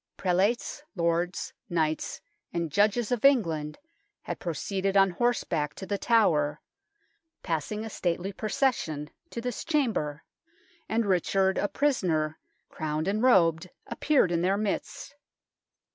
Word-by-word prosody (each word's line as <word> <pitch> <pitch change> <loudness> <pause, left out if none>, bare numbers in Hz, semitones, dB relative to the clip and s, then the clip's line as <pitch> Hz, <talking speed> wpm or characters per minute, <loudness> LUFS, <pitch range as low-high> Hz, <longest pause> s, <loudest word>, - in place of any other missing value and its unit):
Prelates, 195 +10 0
lords, 170 +1 -1 0.2
knights, 160 -2 -1 0.3
and 170 -2 -2
judges 210 - +2
of 245 -3 0
Eng 275 -4 +6
land 150 -3 -4 0.5
had - - -5
proceeded 190 +4 -1
on 195 -1 +5
horseback 175 -8 0
to 190 - -7
The 200 +1 -2
Tower, 155 -11 +3 0.8
passing, 185 +6 -2
a - - -5
stately 180 +2 -2
procession, 195 - -1 0.2
to - - -5
this 245 0 -4
chamber, 225 - 0 0.7
and 225 0 +1
Richard, 190 0 +2
a 205 - +1
prisoner, 175 - 0 0.3
crowned 155 +1 -3
and 210 +2 0
robed, 175 -8 +4 0.2
appeared 280 - +2
in 170 -1 +1
their 190 +3 +2
midst. 210 +6 -3
190 Hz, 125 wpm, -28 LUFS, 165-220 Hz, 0.8 s, Eng